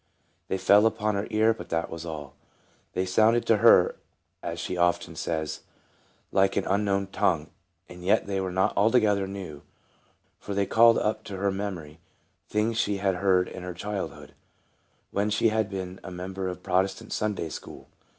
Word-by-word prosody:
They 95 - -1
fell 105 +3 +5
upon 105 -1 -1
her 100 0 -2
ear, 110 +1 +3
but - - -10
that 85 0 -2
was 85 +1 -6
all. 75 -4 -7 0.6
They 95 - 0
sounded 110 +5 +3
to 115 - +4
her, 115 +3 +5 0.4
as 85 0 -5
she 90 - -3
often 85 -1 +1
says, 80 -1 -3 0.7
like 95 0 +3
an 100 - 0
unknown 100 0 +1
tongue. 95 -5 0 0.4
And 90 0 -11
yet 100 +4 +3
they 95 -1 -2
were 95 -1 -3
not 95 +3 +1
altogether 105 -2 +3
new, 95 -7 -7 0.8
for 100 - -6
they 100 0 +2
called 115 +3 +5
up 110 0 -1
to 100 - -6
her 100 +1 0
memory 90 -6 -5 0.5
things 110 +2 0
she 100 -3 +1
had 95 -2 0
heard 90 -1 +3
in - - -8
her 90 -1 -6
childhood, 100 +2 -5 0.8
when 100 +1 0
she 110 +2 +2
had 110 -1 0
been 95 -1 -6
a - - -7
member 95 +1 -5
of 90 - -4
a - - -26
Protestant 95 +1 -1
Sunday 105 -6 -2
school. - - -9
95 Hz, 175 wpm, -27 LUFS, 90-105 Hz, 0.8 s, fell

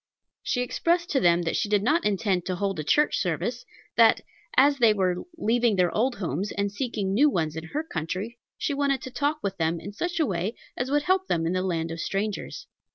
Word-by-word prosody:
She 245 - -1
explained 340 +7 0
to 275 - +2
them 175 -3 +3
that 165 - -1
she 210 - 0
did 205 -1 +2
not 310 +9 +2
intend 195 -3 +1
to 185 - -1
hold 195 -2 -2
a - - -2
church 300 - +2
service; - - -2 0.3
that, - - +6 0.4
as 280 +1 +5
they 225 -3 +5
were 185 -3 +1 0.2
leaving 235 -4 +2
their 180 -2 +1
old 245 +3 +1
homes 185 +1 -3
and 200 0 -1
seeking 205 -3 -2
new 285 +8 +5
ones 160 - -1
in 160 0 -5
her 295 - -3
country, 190 - -4 0.2
she 290 - -1
wanted 280 -2 0
to 260 - -7
talk 290 +4 0
with 195 -1 -2
them 165 0 0
in 200 - -8
such 350 +10 -3
a 315 - +3
way 190 +2 -2 0.2
as 250 +1 -2
would 290 +1 +2
help 375 +2 +1
them 165 -1 0
in 165 - 0
the 185 - 0
land 165 -3 -2
of 165 - -6
strangers. 205 +4 -3
205 Hz, 225 wpm, -26 LUFS, 180-270 Hz, 0.4 s, that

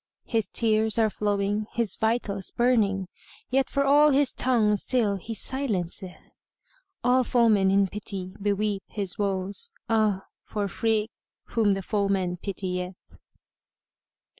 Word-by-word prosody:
His 225 -3 0
tears 220 -1 +1
are 220 -2 +3
flowing, 205 +1 -1
his 225 -4 0
vitals 220 -4 -1
burning; 210 -6 +1 0.2
* - - -23
Yet 270 +1 +2
for 280 - +1
all 295 +2 +6
his 280 -1 +2
tongue 225 -5 +2
still 210 -2 0
he 225 +4 -6
silenceth. 190 -8 -4 0.6
All 255 +1 +4
foemen 225 -6 +3
in 195 +1 +4
pity 190 -2 -5
beweep 205 0 0
his 200 -3 -2
woes; 200 - -1
* - - -50
Ah 215 -4 +2 0.2
for 205 -1 -3
freke 220 +2 0 0.4
whom 210 -4 +2
the 195 - -4
foeman 195 -3 0
pitieth!" 180 -1 -4
210 Hz, 130 wpm, -26 LUFS, 195-230 Hz, 0.6 s, all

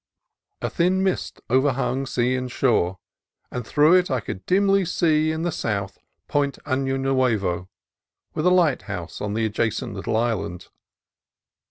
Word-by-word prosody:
A - - 0
thin 185 +2 +2
mist 190 -1 -2
overhung 135 +1 +1
sea 125 0 +1
and 130 -1 -3
shore, 100 -9 +1 0.5
and 125 -3 -5
through 150 +3 +5
it 180 -1 +4
I 130 -2 +1
could 95 -3 -6
dimly 195 +1 +3
see 155 -3 +2
in 160 +1 -3
the 175 - 0
south 100 -7 -3 0.3
Point 140 -1 0
Ano 135 -1 0
Nuevo, 110 -10 0 0.6
with 155 - 0
a - - +7
lighthouse 175 -6 0
on 105 0 -2
the 110 0 +1
adjacent 110 +2 -1
little 100 +2 -2
island. 105 -6 -2
130 Hz, 145 wpm, -23 LUFS, 110-155 Hz, 0.6 s, a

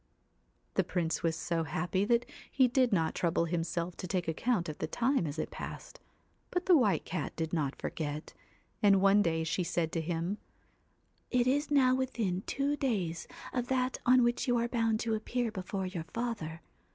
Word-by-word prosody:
The - - +2
Prince 165 -3 -1
was 165 -1 +1
so 170 0 -1
happy 180 +5 -1
that 235 +2 +2 0.2
he 260 -2 +4
did 250 0 +2
not 165 -5 +2
trouble 170 -1 +1
himself 170 +1 -2
to 180 - -5
take 180 -1 -1
account 175 +3 0
of 155 - -6
the - - -1
time 245 - +1
as 145 +1 -5
it 155 - -3
passed, - - -8 0.5
but 360 0 -1
the 365 - +7
White 225 - +3
Cat 165 -4 -3
did 160 0 -3
not 145 -5 0
forget, 150 -1 -4 0.5
and 200 -3 +6
one 195 +2 +5
day 165 -4 +1
she 170 +3 0
said 165 -1 -1
to 165 - -1
him 170 +4 -2 0.5
' - - -42
It 250 -1 +2
is 285 +4 +1
now 265 -3 +5
within 230 -8 -1
two 280 +1 0
days 190 - -1 0.3
of 245 -1 -1
that 255 0 0
on 250 0 +6
which 240 +2 +1
you 245 -1 +3
are 235 0 +1
bound 225 -2 +1
to 225 -1 0
appear 230 +2 -1
before 190 -1 -3
your 180 -3 -4
father. 205 -9 -4
195 Hz, 190 wpm, -31 LUFS, 165-245 Hz, 0.5 s, the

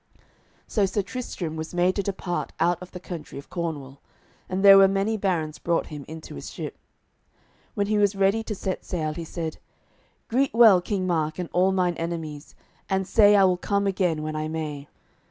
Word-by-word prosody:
So 205 -3 +1
Sir 195 +1 -1
Tristram 190 -7 -5
was 160 +2 -6
made 180 +1 +2
to 200 - 0
depart 190 -2 -3
out 175 +1 +2
of 180 - -9
the 180 - -9
country 170 -5 -8
of 140 - -11
Cornwall, 145 -6 -4 0.5
and 190 +1 0
there 195 0 +10
were 195 - +8
many 195 +3 0
barons 175 -7 -1
brought 170 -1 0
him 145 -2 -7
into 160 0 -9
his 70 - -7
ship. - - -6 1.0
When 200 - +1
he 210 +1 +1
was 205 -1 +3
ready 195 +3 +2
to 215 - -4
set 190 -1 -4
sail 155 -4 -2
he 170 - -6
said: 160 -1 -5 0.7
"Greet 265 +1 +1
well 220 -6 +7
King 190 0 -2
Mark 160 -3 0
and 180 -2 -4
all 185 +2 +3
mine 180 -2 +1
enemies, 160 -3 -5 0.3
and 190 0 0
say 205 -1 +6
I 200 - +6
will 185 -1 +3
come 200 +2 0
again 180 -5 0
when 155 0 -4
I 155 0 -2
may. 150 -3 -5
180 Hz, 190 wpm, -25 LUFS, 160-195 Hz, 1.0 s, there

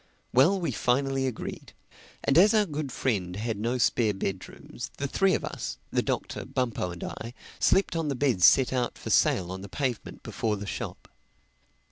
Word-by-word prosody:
Well, 160 +11 +5
we 170 - -1
finally 135 +1 +1
agreed; 125 - -6 0.5
and 140 - +2
as 205 +7 +6
our 210 -1 +4
good 150 -5 -4
friend 95 -9 -1
had 110 0 -3
no 120 +4 0
spare 115 -3 +2
bedrooms, 95 -10 -5
the 140 - -2
three 195 +6 +2
of - - -2
us, - - -5
the - - +2
Doctor, - - -3
Bumpo 120 -8 -2
and 85 -1 -7
I, 115 +2 -6 0.2
slept 195 -2 +3
on 165 -2 -1
the 140 - -1
beds 125 -8 +1
set 130 -1 +6
out 125 -2 -1
for - - -5
sale 90 -2 +3
on 95 0 -6
the 100 - -9
pavement 125 0 -3
before 110 -2 -2
the 100 - -6
shop. - - -6
125 Hz, 180 wpm, -28 LUFS, 105-140 Hz, 0.5 s, as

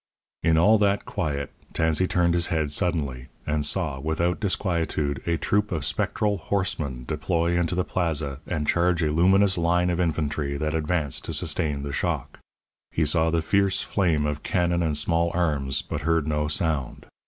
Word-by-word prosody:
In 80 0 +3
all 105 +6 +5
that 100 -1 +1
quiet 70 -3 -3 0.2
Tansey 80 +3 +2
turned 85 -2 +2
his 85 0 +2
head 80 -3 -1
suddenly, 75 -7 -1 0.2
and 75 0 0
saw, 75 -3 0
without 80 +4 -1
disquietude, 85 -7 -1
a 85 -1 +1
troop 105 +7 0
of 80 -5 -2
spectral 105 +6 0
horsemen 75 -10 -2
deploy 85 +2 0
into 85 0 0
the 90 - +1
Plaza 80 -7 -2
and 75 -4 -2
charge 85 -1 +2
a 75 - +1
luminous 95 +3 +4
line 90 +1 +2
of 85 - -1
infantry 75 -4 -1
that 75 +2 -2
advanced 80 -2 -1
to - - -4
sustain 75 -3 -1
the 70 0 -5
shock. - - -2 0.5
He 80 - 0
saw 80 +2 +2
the 80 0 0
fierce 100 +2 +2
flame 85 -7 +1
of 75 0 -2
cannon 85 -1 0
and 80 -3 +1
small 85 +3 +2
arms, 75 -6 0
but 80 -2 -4
heard 80 0 +1
no 75 -1 0
sound. 75 -3 -2
80 Hz, 170 wpm, -25 LUFS, 75-90 Hz, 0.5 s, all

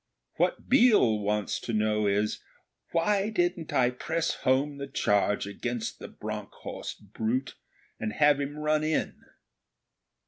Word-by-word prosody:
What - - 0
Biel 225 - +5
wants 105 0 -1
to 115 - -5
know 105 -1 +1
is, 105 +2 +1 0.5
'Why 195 +4 +2
didn't 175 -5 -1
I 125 -1 +3
press 160 +6 -1
home 140 +3 +1
the 140 - -4
charge 105 -6 +1
against 120 +3 -4
the - - -7
Bronckhorst - - -7
brute, 120 +4 -1 0.5
and 110 -1 -3
have 145 +3 +4
him 145 +1 -4
run 150 0 +1
in?' 155 0 -1
135 Hz, 130 wpm, -28 LUFS, 110-160 Hz, 0.5 s, Biel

